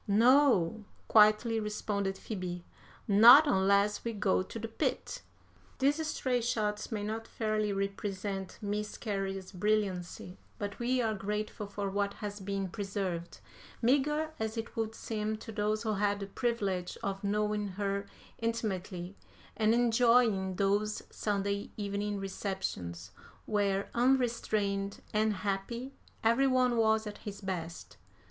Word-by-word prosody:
"'No,' 225 -3 +4 0.2
quietly 215 +1 +5
responded 205 -2 -2
Phoebe, 180 -5 -5 0.4
'not 235 +8 +9
unless 200 -3 +3
we 230 - -2
go 200 -3 +2
to 185 - -7
the 225 0 -4
pit.'" 225 - -2 0.6
These 290 +4 +1
stray 255 -5 0
shots 215 -2 -1
may 210 -2 -2
not 220 +2 -4
fairly 215 -2 -1
represent 195 -1 -3
Miss 210 +1 -3
Cary's 195 -3 -3
brilliancy, 185 -2 -1 0.2
but 205 0 -5
we 250 +1 +1
are 220 -1 +1
grateful 210 +1 -3
for 200 0 -3
what 200 0 -1
has 205 -1 -6
been 195 0 -2
preserved, 190 -4 -4 0.4
meagre 295 +5 +2
as 220 +1 -2
it 225 - -5
would 225 -1 -2
seem 215 -1 -2
to 225 - -9
those 215 +1 0
who 220 -2 0
had 205 0 +1
the 200 - -4
privilege 195 -4 -2
of 195 0 -3
knowing 210 0 0
her 200 +1 -2 0.3
intimately 195 -5 -3 0.4
and 220 -1 +3
enjoying 230 -5 +3
those 205 +2 +1
Sunday 200 -1 -1
evening 205 0 -2
receptions, 185 - -4 0.3
where, 200 -2 0
unrestrained 230 -6 +1
and 215 +1 +3
happy, 235 +7 -3 0.3
every 235 +5 +4
one 255 -2 +3
was 220 -1 +3
at 210 -1 -7
his 200 -1 -7
best. 180 -4 -5
210 Hz, 130 wpm, -31 LUFS, 195-225 Hz, 0.6 s, not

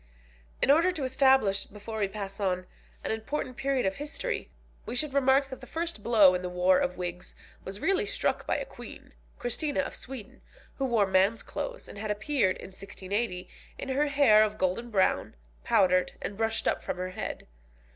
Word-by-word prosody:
In 275 - +6
order 335 +5 +5
to 315 -6 -4
establish, 260 -6 +3
before 215 +2 -7
we 200 - +2
pass 195 0 -6
on, 185 -2 0 0.4
an - - -1
important 255 +4 -3
period 270 -3 0
of 190 0 0
history, 300 +12 -3 0.3
we 240 - -5
should 285 +2 -1
remark 270 0 +4
that 260 - -8
the - - -10
first 330 -6 -3
blow 205 -5 +6
in 180 - -1
the 180 - -3
war 180 +1 +3
of 180 - -1
wigs 180 0 -5 0.3
was 195 +1 -6
really 390 +2 +2
struck - - -1
by - - +1
a - - -3
Queen, - - -11 0.2
Christina 285 +4 -1
of - - -5
Sweden, 255 -6 -8 0.4
who 270 - +1
wore 230 -5 +3
man's 190 +3 +2
clothes, - - -5
and 205 - -10
had 215 +1 -4
appeared 210 -1 +1
in - - -9
1680, 195 0 -4 0.3
in - - -5
her 285 +3 +2
hair 275 -7 +6
of 215 0 -1
golden 190 +6 -1
brown, 195 -4 +1 0.3
powdered, 185 -5 +3
and 200 - -5
brushed 225 +1 -1
up - - +1
from - - -4
her 185 0 -3
head. - - -5
220 Hz, 185 wpm, -29 LUFS, 190-270 Hz, 0.4 s, In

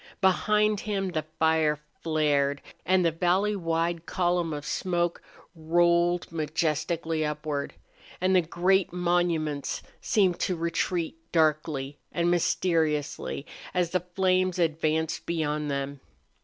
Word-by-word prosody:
Behind 210 +2 +3
him 195 -2 -2
the 155 -3 -3
fire 160 -1 +3 0.2
flared 145 -3 +1 0.2
and 185 -1 +4
the 165 - +3
valley 185 +5 +1
wide 165 -1 -1
column 175 -2 0
of 145 -1 -5
smoke 175 -2 -1 0.3
rolled 170 +2 +2
majestically 160 +1 -1
upward, 150 -1 -3 0.4
and 185 +1 +2
the 180 - +6
great 180 +3 +1
monuments 170 -4 0 0.2
seemed 190 -5 +2
to 185 - 0
retreat 170 0 -1
darkly 155 -3 +1
and 170 0 +1
mysteriously 160 -5 0 0.3
as 175 -2 +1
the 185 - +2 0.2
flames 185 -1 +2
advanced 160 -1 0
beyond 150 -3 -1
them. 140 0 -3
165 Hz, 115 wpm, -27 LUFS, 155-180 Hz, 0.4 s, the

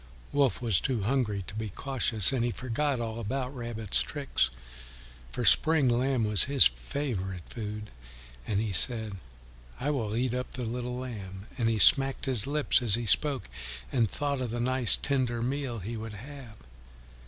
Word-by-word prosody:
Wolf 135 -3 +1
was 110 -8 +1
too 125 -6 -2
hungry 105 -4 -1
to - - -10
be 110 0 -5
cautious, 115 -1 +4
and 125 -3 0
he 120 - 0
forgot 130 +3 -2
all 115 -1 -5
about 130 +4 -4
Rabbit's 115 -4 -3
tricks, 140 - -2 0.8
for - - -4
spring 155 -4 +5
lamb 125 0 0
was 105 -4 +5
his 140 -1 +5
favourite 95 - -3
food. 105 -2 -7 0.6
And 100 - -1
he 110 -1 -2
said, 110 -3 +2 0.6
"I 145 +3 -1
will 110 -7 -3
eat 125 +1 -1
up 125 0 -5
the 125 -2 -5
little 125 +2 -5
lamb," 100 -7 -8
and 115 -3 0
he 115 - 0
smacked 135 +6 +5
his 125 -5 +3
lips 150 -2 +1
as 110 -5 +5
he 120 0 -4
spoke, 140 +4 +2 0.4
and 115 -4 +1
thought 140 +2 -3
of 125 - -3
the 120 +2 -4
nice 130 0 +4
tender 125 -4 -1
meal 130 -1 -3
he 110 +4 -6
would 110 0 -7
have. 125 +1 -11
120 Hz, 170 wpm, -28 LUFS, 110-135 Hz, 0.8 s, spring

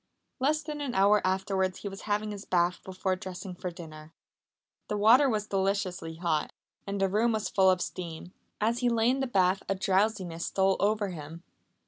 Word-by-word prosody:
Less 305 +4 +1
than 295 -1 -5
an 275 -4 -3
hour 200 +2 +5
afterwards 190 0 0
he - - -3
was 195 0 -7
having 210 +1 0
his 205 -1 -7
bath 175 -1 +1
before 185 0 -2
dressing 185 0 -7
for 180 +1 -5
dinner. 160 -2 -11 0.7
The 210 - -2
water 240 +7 +6
was 215 -3 -1
deliciously 190 -4 -1
hot, 165 -2 -1 0.4
and 200 0 -3
the 195 - +3
room 220 +4 +2
was 215 -1 -1
full 190 -1 +4
of 185 -1 +2
steam. 175 0 -6 0.3
As 230 +3 +1
he 245 -1 +2
lay 230 +1 +3
in 265 - -1
the 270 - 0
bath 190 -4 +2
a 195 - +1
drowsiness 190 -3 0
stole 190 0 +2
over 210 0 +1
him. 165 0 -8
195 Hz, 185 wpm, -29 LUFS, 180-215 Hz, 0.7 s, water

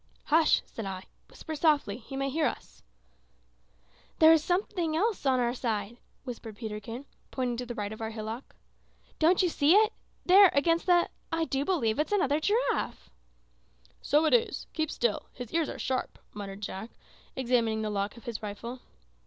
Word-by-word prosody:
"Hush!" 320 +1 +4
said 220 -3 -7
I. 190 -1 -5 0.3
"Whisper 315 - -8
softly. 295 -9 +2
He 265 +3 -8
may 275 0 -1
hear 310 +2 +2
us." - - -7 1.4
"There 315 0 +8
goes 315 -2 +3
something 350 -3 0
else 415 -5 0
on 260 -1 +3
our 240 0 +1
side," 225 -3 -3 0.3
whispered 230 -4 -8
Peterkin, 225 +3 -6 0.2
pointing 250 -2 -2
to 250 0 -5
the 240 - -5
right 205 -1 -3
of 220 - -10
our 220 - -2
hillock. 220 +3 -7 0.6
"Don't 350 +4 +4
you 360 - +3
see 315 +2 +4
it? 435 +1 +5 0.3
There, 385 +1 +8
against 330 +5 +2
the 350 -1 +5 0.2
I 325 0 +1
do 275 -2 -1
believe 285 -9 0
it's 305 - 0
another 300 -8 +2
giraffe!" 410 - -1 0.9
"So 300 +3 +3
it 315 - +2
is! 470 -1 +2
Keep 315 -2 -1
still. 235 -4 -1
His 245 -3 -8
ears 325 -2 +1
are - - -6
sharp," 260 -1 -2 0.2
muttered 200 -1 -7
Jack, 200 +2 -5 0.5
examining 235 -4 +1
the 215 - -2
lock 200 +2 -2
of 235 - -13
his 235 -3 -5
rifle. 225 +4 -6
260 Hz, 170 wpm, -29 LUFS, 220-320 Hz, 1.4 s, There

